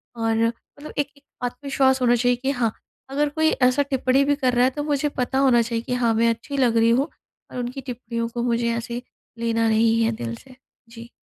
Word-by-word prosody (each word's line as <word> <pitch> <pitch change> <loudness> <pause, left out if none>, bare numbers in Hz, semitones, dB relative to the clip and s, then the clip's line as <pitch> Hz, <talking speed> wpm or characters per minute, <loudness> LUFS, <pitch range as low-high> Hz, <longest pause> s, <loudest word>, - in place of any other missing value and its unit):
और 225 -1 0
मतलब 285 +5 -9
एक 290 - +1
एक 280 - -23 0.2
आत्मविश्वास 265 +1 +1
होना 245 -1 +4
चाहिए 245 +1 +2
कि 270 - +1
हाँ, 240 -5 0 0.4
अगर 290 +2 0
कोई 315 +2 +2
ऐसा 255 +2 +3
टिप्पणी 270 -1 +2
भी 285 0 +2
कर 260 -3 0
रहा 245 0 +3
है - - +4
तो 290 +2 -4
मुझे 295 0 0
पता 255 +1 -1
होना 255 -3 +5
चाहिए 230 0 -2
कि - - -1
हाँ, 240 -2 +2
मैं 230 +1 +3
अच्छी 235 +5 -3
लग 240 -4 +3
रही 225 0 +4
हूँ 260 +5 +2 0.4
और - - -7
उनकी 245 +3 -4
टिप्पणियों 235 -2 -4
को 235 0 -3
मुझे 235 -1 +1
ऐसे 235 +1 -5 0.4
लेना 230 -1 +1
नहीं 225 +1 +3
है 225 - +2
दिल 115 - -5
से। 255 - -16 0.3
जी। 230 0 -11
245 Hz, 220 wpm, -23 LUFS, 230-270 Hz, 0.4 s, होना